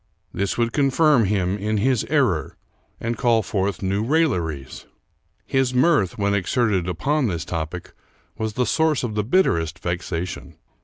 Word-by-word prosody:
This 100 0 -2
would 115 -1 0
con 140 -2 +2
firm 140 -4 +4
him 95 0 0
in 105 +2 -1
his 125 +2 +1
error 130 - 0 0.4
and 115 -1 -3
call 115 -2 +3
forth 100 -1 -2
new 100 +2 0
railleries. 90 - -1 0.6
His 130 -2 0
mirth, 130 - +3
when 100 -1 +1
exerted 100 -2 0
upon 135 - 0
this 85 -5 -3
topic, 85 +1 -5 0.4
was 110 -1 -3
the 125 +2 0
source 160 -1 +1
of 120 -3 -2
the 105 0 0
bitterest 85 - +1
vexation. 90 0 -4
105 Hz, 150 wpm, -22 LUFS, 90-130 Hz, 0.6 s, firm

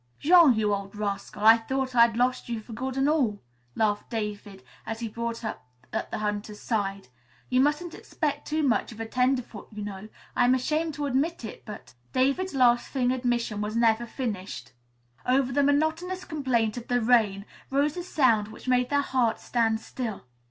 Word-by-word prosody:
"Jean, 330 -5 +6
you 210 -1 +1
old 200 0 -4
rascal, 205 0 -4
I 225 +1 +9
thought 265 +3 -2
I'd 235 -1 +5
lost 250 0 0
you 230 -2 -2
for 220 +2 -11
good 260 +3 -4
and 270 +1 +2
all," 260 -10 +1 0.4
laughed 210 -2 0
David 210 -3 -5 0.2
as 225 0 -5
he 235 - -3
brought 230 +1 -4
up 220 - -5 0.3
at - - -2
the - - -3
hunter's 210 0 -3
side. 200 - -2 0.4
"You 255 0 +3
mustn't 300 +4 0
expect 290 -2 -3
too 310 +1 0
much 255 -4 +1
of 225 - -11
a 225 - -3
tenderfoot, 250 -2 -1
you 210 -1 -6
know. 205 +1 -7 0.3
I'm 245 +1 +4
ashamed 310 +4 -1
to 295 - -2
admit 280 +1 -1
it, - - -9
but 210 - -9
" 120 - -36
David's 275 +8 +1
laughing 250 0 +3
admission 240 -4 -1
was 210 +1 -3
never 230 0 +2
finished. 220 -6 -5 0.5
Over 260 +1 +2
the 285 - +2
monotonous 315 +6 0
complaint 250 -7 0
of 240 - -7
the 245 0 +2
rain 220 -4 +3 0.2
rose 285 +2 +1
a 355 - -3
sound 235 - +2
which 220 - -12
made 250 -1 +2
their 285 0 +2
hearts 255 -5 0
stand 225 -2 +1
still. 225 - -5
240 Hz, 180 wpm, -27 LUFS, 215-270 Hz, 0.5 s, I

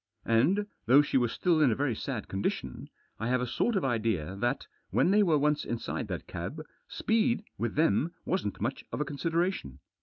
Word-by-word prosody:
And, 145 - +3 0.2
though 135 +5 +7
she 145 - -4
was 120 -2 +1
still 170 -4 +2
in 145 - +6
a - - +1
very 135 -3 0
sad 115 -1 -4
condition, 95 +1 -3 0.3
I 110 - -2
have 130 +1 +2
a 125 - -1
sort 215 - 0
of 190 - +1
idea 110 - 0
that, 120 +6 -1 0.2
when 180 - +3
they 210 +1 +5
were 165 -6 +4
once 150 +1 +2
inside 120 -1 -3
that - - -5
cab, - - -5 0.3
speed 225 0 +1 0.2
with 120 -1 -2
them 160 +1 +2
wasn't 180 - -1
much - - -2
of - - -3
a 150 - 0
consideration. 165 - -1
140 Hz, 190 wpm, -30 LUFS, 115-170 Hz, 0.3 s, though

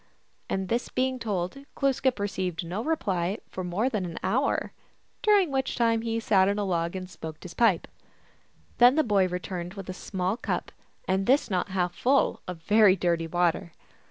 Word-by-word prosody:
And 190 -1 -1
this 235 +5 -1
being 260 0 -1
told, 205 +1 -3 0.2
Glooskap 270 -2 +1
received 185 -4 -2
no 185 +7 -3
reply 195 - -1
for 185 - -5
more 180 +6 -1
i:in 220 -7 0
im 170 -2 -6
hour, 245 +9 0 0.5
during 405 -7 +4
which 265 -1 -1
time 230 -1 +2
he 230 0 -1
sat 195 -4 +3
on 200 - 0
a 205 - 0
log 170 -2 -1
and 185 -1 -4
lokecl 160 -3 -8
his 180 -2 -8
pipe. 210 -6 +2 0.9
Then 245 +2 +7
the 315 - +3
boy 200 -6 +3
returned 180 0 -5
with 195 -2 -8
a - - -3
small 190 +3 -3
up, - - -2 0.4
and 190 +1 0
this 265 -2 +3
not 185 +1 0
half 180 -2 -1
full, 270 +2 +2
of 175 -3 -7
very 210 0 +5
dirty 170 -2 0
water. 170 0 0
195 Hz, 180 wpm, -27 LUFS, 180-235 Hz, 0.9 s, Then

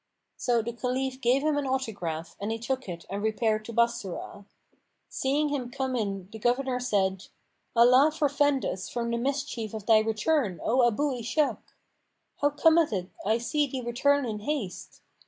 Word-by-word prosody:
So 240 -3 +1
the 235 +1 -4
Caliph 260 +2 -2
gave 255 +3 +3
him 305 -1 +1
an 280 - -3
autograph 195 -11 -3
and 205 +2 -3
he 225 - -1
took 255 0 -3
it 170 -1 -7
and 200 +2 -4
repaired 215 0 0
to 235 - -6
Bassorah. 235 -4 -1 0.6
Seeing 290 +3 0
him 265 -4 -2
come 265 0 -2
in 195 -5 -2
the 220 - -8
governor 250 +2 +1
said, 195 -6 0 0.5
"Allah 250 +5 +6
forfend 290 -2 +1
us 185 0 -3
from 235 -1 -2
the 235 - 0
mischief 265 -4 -2
of 215 -2 -6
thy 220 -1 +6
return, 220 - 0
O 245 +1 +4
Abu 285 +6 0
Ishak! 240 +6 0 0.8
How 290 - +2
cometh 320 +1 +4
it 185 -3 -3 0.2
I 220 +2 +3
see 290 +5 0
thee 260 -1 -4
return 270 +4 +2
in 215 -3 -3
haste? 225 -5 -4
240 Hz, 170 wpm, -28 LUFS, 215-275 Hz, 0.8 s, Allah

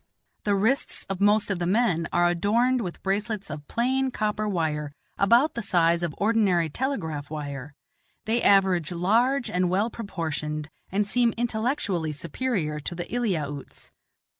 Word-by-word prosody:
The 205 -1 +3
wrists 225 +8 0
of 195 0 -4
most 205 0 +3
of 190 - -1
the 175 - -1
men 180 -5 +2
are 175 0 +3
adorned 230 +9 +2
with 180 -5 -6
bracelets 200 -1 -2
of 150 -1 -7
plain 260 +3 +1
copper 215 -2 -1
wire 150 -5 -1 0.2
about 235 +10 +4
the 235 - -3
size 170 -4 +2
of 170 -4 -2
ordinary 200 -7 +2
telegraph 160 - -3
wire; 145 -2 -6 0.5
they 230 +2 +1
average 190 -5 +4
large 235 +10 +2
and 180 0 0
well 200 +6 +1
proportioned, 155 -7 -4 0.2
and 200 +2 +1
seem 240 +1 +2
intellectually 220 - -1
superior 165 - -2
to 170 +4 -5
the 175 0 -4
Eliautes. 160 - -3
195 Hz, 145 wpm, -26 LUFS, 165-230 Hz, 0.5 s, about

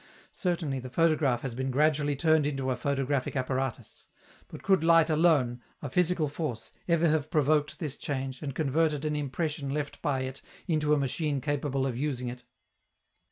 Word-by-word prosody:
Certainly 170 -7 -1
the 130 0 -7
photograph 150 -5 +2
has 135 -3 -4
been 130 +2 -2
gradually 145 +1 +2
turned 155 0 +3
into 135 -2 -1
a - - 0
photographic 140 0 -1
apparatus; 130 -1 -3 0.4
but - - -10
could 190 -4 +3
light 165 -1 +5
alone, 150 -7 +3 0.2
a 145 - -6
physical 180 -1 +2
force, 145 -6 -5 0.2
ever 170 -1 +3
have 155 -1 +1
provoked 150 -1 +2
this 150 -4 -4
change, 135 -2 -4
and 140 -3 -5
converted 155 0 +1
an 150 0 0
impression 150 0 -2
left 145 +1 -3
by 135 -3 0
it 130 +1 -5 0.3
into 150 -3 +2
a - - +1
machine 140 +1 -1
capable 140 -1 -1
of 130 -3 -2
using 130 -4 -2
it? 125 0 -9
145 Hz, 165 wpm, -29 LUFS, 135-155 Hz, 0.4 s, light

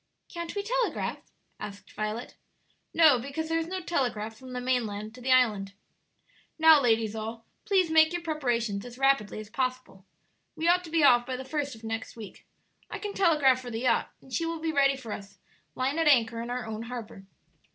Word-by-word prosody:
"Can't 340 +1 -6
we 405 - -2
telegraph?" - - -1 0.4
asked 200 -1 -9
Violet. 215 +3 -4 0.6
"No; 310 -6 +6
because 280 +6 -4
there 325 0 +1
is 325 - -3
no 375 +1 -4
telegraph 240 -10 -2
from 255 +2 -11
the 250 - -3
mainland 220 -4 -2
to 250 - -12
the 260 +1 0
island. 210 -6 +3 0.8
"Now, 320 -2 +7
ladies 225 -3 +2
all, 225 +1 -6 0.2
please 375 -5 +2
make 315 0 +6
your 350 -1 -3
preparations 240 -10 -1
as 245 0 -10
rapidly 270 -6 +2
as 215 0 -10
possible. 255 -6 -3 0.5
We 325 - -1
ought 360 +1 +4
to - - -9
be 320 -1 +2
off 245 -3 +6
by 260 - -2
the 260 +1 -6
first 285 -2 -3
of 225 - -16
next 225 0 -5
week. 215 -3 -11 0.4
I - - -5
can 415 -1 -5
telegraph 300 -9 +3
for 250 - -7
the 225 -1 -4
yacht, 250 -2 +2
and 265 - -14
she 335 - 0
will 330 0 -3
be 320 0 -1
ready 275 -2 +3
for 235 -5 -8
us, 200 -1 -8 0.4
lying 270 +5 -1
at 325 - +2
anchor 230 -5 +4
in 235 - -6
our 250 +1 -3
own 220 0 -5
harbor. 230 -5 -8
255 Hz, 200 wpm, -28 LUFS, 225-315 Hz, 0.8 s, Now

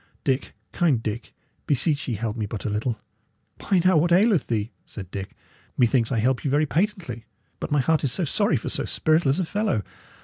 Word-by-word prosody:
"Dick, 135 -1 -1 0.2
kind 145 -10 +1
Dick, 110 +2 -4 0.4
beseech 145 +1 +1
ye 120 - -1
help 110 +1 -3
me 110 -3 -3
but 105 0 -6
a 105 - -1
little!" 110 +2 -2 0.6
"Why, 190 -3 +2
now, 185 -2 +5
what 170 +3 +2
aileth 195 0 +4
thee?" 110 0 -1 0.2
said 95 -4 -9
Dick. 95 -1 -6 0.4
"Methinks 120 -1 +3
I 125 - +1
help 125 +4 +1
you 140 - 0
very 145 +3 +3
patently. 170 - -2 0.3
But - - -4
my 145 -2 +3
heart 160 +4 +1
is 135 - +1
sorry 170 +3 +1
for 110 - -4
so - - 0
spiritless 155 -3 +2
a 185 - 0
fellow! 200 - 0
135 Hz, 195 wpm, -24 LUFS, 115-165 Hz, 0.6 s, now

